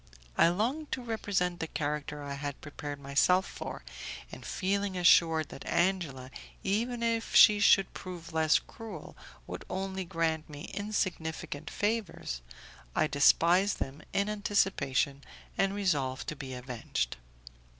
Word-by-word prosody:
I - - +6
longed 245 - -1
to 255 - -3
represent 195 -6 -1
the 165 - -2
character 150 -1 -3
I 140 0 -4
had 140 0 -5
prepared 145 -1 -7
myself 145 +7 +3
for, - - -7 0.5
and - - -9
feeling 200 0 -1
assured 165 -4 +5
that - - -9
Angela, 165 -8 0 0.3
even 235 +4 0
if 230 -1 0
she 210 -1 +9
should 195 -1 +5
prove 175 -3 -8
less 160 -1 +4
cruel, 225 -1 -9 0.3
would - - -6
only 190 0 -3
grant 165 -3 -1
me 145 -1 -8
insignificant 170 -7 -3
favours, 205 - -2 0.5
I - - +4
despised 170 +7 +4
them 135 +2 -4
in 200 +1 +1
anticipation, 195 -10 +1 0.3
and 195 0 +1
resolved 140 -10 0
to 150 - -4
be 135 -3 -6
avenged. 120 - -3
170 Hz, 130 wpm, -31 LUFS, 145-200 Hz, 0.5 s, she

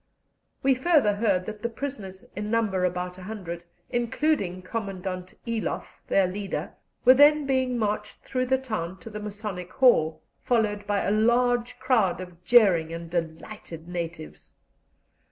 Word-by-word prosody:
We 270 0 +5
further 260 -5 +3
heard 200 -4 +1
that 210 0 -7
the 235 - -1
prisoners, 220 -7 -6
in 210 +2 -3
number 210 -5 +1
about 180 0 -3
a - - -10
hundred, 180 -4 -6 0.3
including 235 - 0
Commandant 185 -3 -5
Eloff, 230 -2 -3
their 195 - +4
leader, 195 +2 -4 0.3
were 255 - +10
then 290 +2 +6
being 260 -2 +1
marched 210 -1 -2
through 255 -1 -1
the 265 +1 +3
town 215 -9 -4
to 225 - -9
the 210 - -5
Masonic 205 -3 -6
Hall, 165 -12 +4 0.2
followed 210 -4 0
by 205 -1 +1
a - - +1
large 240 +2 +2
crowd 225 -10 +2
of 180 -1 -10
jeering 180 -8 +5
and 165 0 -7
delighted 165 0 -5
natives. 170 -2 -6
210 Hz, 145 wpm, -26 LUFS, 180-240 Hz, 0.3 s, were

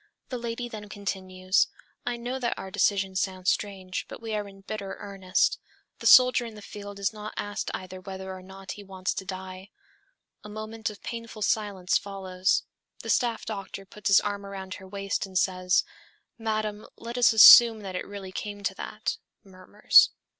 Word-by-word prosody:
The 250 - -4
lady 235 +1 -4
then 215 -3 -9
continues, 185 -1 0 0.4
'I 240 0 -1
know 245 +3 -4
that 240 -2 -1
our 190 - -7
decision 195 -1 +1
sounds 185 -1 +1
strange, 190 -3 -4
but - - -8
we 225 -1 -5
are 210 -1 -2
in 195 0 -14
bitter 195 -1 -6
earnest. 195 -2 0 0.4
The - - -1
soldier 250 -1 +7
in 230 -2 -8
the 210 - -10
field 205 -1 -9
is 200 +2 -1
not 215 0 -8
asked 205 0 -3
either 185 0 -8
whether 190 0 -7
or 185 - -10
not 190 +1 -10
he 205 - -8
wants 190 -1 -3
to 190 - -5
die.' 185 0 -7 0.7
A 210 - -9
moment 215 +1 -5
of 210 - -12
painful 230 -2 -6
silence 200 -4 +1
follows. 190 -2 -1 0.4
The - - -1
staff 235 -3 +1
doctor 195 -2 -6
puts 210 +1 -6
his 200 - +7
arm 205 -1 -3
around 195 -1 -7
her 190 0 -10
waist 195 +1 -3
and 190 -1 -4
says, 185 -1 +2 0.6
'Madame, 215 -1 -2
let 235 +1 -7
us 245 -1 +5
assume 225 0 +10
that 190 -2 -6
it - - -4
really 200 -2 -8
came 205 +1 -6
to 195 - 0
that 210 +2 -4
...' - - -56
(murmurs). 195 +1 +4
200 Hz, 180 wpm, -27 LUFS, 190-215 Hz, 0.7 s, assume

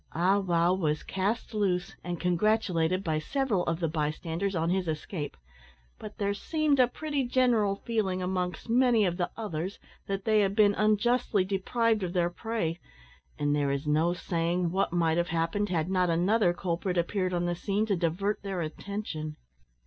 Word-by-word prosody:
Ah 185 +5 +3
wow 175 -2 +2
was 155 -5 0
cast 205 +5 -2
loose 195 -2 0
and 175 -2 -4
congratulated 180 -1 +1
by 155 -3 0
several 245 - 0
of 165 0 -1
the 165 - 0
bystanders 160 +5 -2
on 165 +1 +1
his 185 -1 0
escape, 155 -1 -4 0.6
but 210 -1 -9
there 200 -1 0
seemed 300 +6 0
a 250 - +6
pretty 290 +2 -2
general 240 -5 +2
feeling 210 -5 0
amongst 180 0 -2
many 235 -2 +4
of 175 -1 -1
the 175 -1 -1
others 190 -4 -4 0.3
that 195 -1 -3
they 215 -1 +4
had 195 -1 +1
been 205 -1 +5
unjustly 215 -1 +2
deprived 215 +3 +1
of 180 -2 -3
their 175 -2 +1
prey, 175 -5 -3 0.6
and 145 0 +1
there 145 -1 +1
is 140 +2 -2
no 155 +3 +2
saying 175 0 -1
what 190 0 0
might 165 -2 +2
have 175 - 0
happened 165 +5 -1
had 165 -3 0
not 185 -1 +1
another 180 +4 +3
culprit 180 +1 -2
appeared 185 +2 0
on 175 -1 0
the 175 - 0
scene 200 +4 -1
to 205 -3 +1
divert 180 +5 -1
their 195 -3 -3
attention. 155 -2 -5
185 Hz, 170 wpm, -29 LUFS, 170-210 Hz, 0.6 s, a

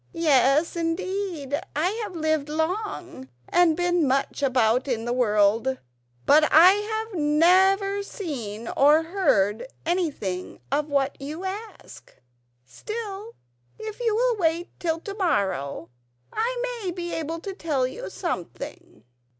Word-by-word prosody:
"Yes, 300 -1 +3
indeed, 335 -3 -2
I've 385 +6 -1
lived 315 -2 0
long 320 - -3 0.2
and 345 -3 +3
been 350 -3 +2
much 270 +2 0
about 250 -2 +2
in 235 -3 -2
the 240 - -1
world, 225 +2 +2 0.5
but 305 +2 +6
I 340 +4 +9
have 440 +2 -3
never 380 +6 +4
seen 235 - -6
or 300 +3 +4
heard 235 - +1 0.2
anything 295 - -2
of 295 +2 0
what 275 -1 0
you 305 +6 -6
ask. 415 +3 -8 0.5
Still, 430 - -7 0.4
if 435 0 -7
you 460 -3 +1
will 485 0 +2
wait 335 -1 0
till 330 -2 -1
to 400 - -6
morrow 190 - -1 0.4
I - - -2
may 375 - -1
be 345 -1 -5
able 325 +1 -3
to 390 +3 -6
tell 305 -8 -1
you 460 - -6
something." 350 -1 -6
330 Hz, 125 wpm, -25 LUFS, 275-390 Hz, 0.5 s, I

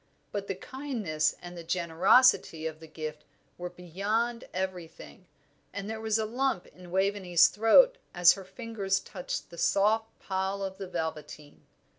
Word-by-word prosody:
But 200 -1 -4
the 195 - -2
kindness 205 - -2
and 175 0 -8
the 170 - -8
generosity 170 +2 +3
of 160 -1 -4
the 160 - -12
gift 155 -1 -7 0.3
were 180 0 -6
beyond 205 +7 -2
everything, 185 -1 -6 0.5
and 200 0 -5
there 220 0 -5
was 220 -1 +1
a 220 - 0
lump 245 -3 -1
in 180 -1 -15
Waveney's 190 -2 +3
throat - - +5
as 175 -1 +6
her 195 - -9
fingers 200 -2 -2
touched 265 - -6
the 170 - -9
soft 220 +5 +2
pile 190 +1 -2
of 190 0 -5
the 195 - -5
velveteen. 160 -3 -6
190 Hz, 150 wpm, -29 LUFS, 170-220 Hz, 0.5 s, as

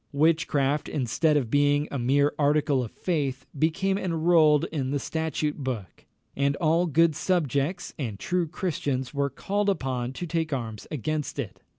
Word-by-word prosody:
Witchcraft, 150 -2 +2
instead 150 +4 +1
of 120 -6 -1
being 145 +1 +3
a 140 - -2
mere 140 +4 +2
article 145 -2 +2
of 115 - -5
faith, 140 - -2
became 190 +6 +1
enrolled 165 -4 +3
in 140 -5 -2
the 145 - 0
statute 155 0 -2
book; 125 -9 -5 0.3
and 140 0 +1
all 165 +3 +2
good 165 0 +3
subjects 155 -2 0
and 115 -8 -3
true 175 - -1
Christians 140 -7 -2
were 140 0 0
called 200 +9 -1
upon 130 -8 -2
to 175 - -5
take 165 -1 -2
arms 115 -5 -4
against 155 +1 -3
it. - - -5
145 Hz, 155 wpm, -26 LUFS, 135-165 Hz, 0.3 s, being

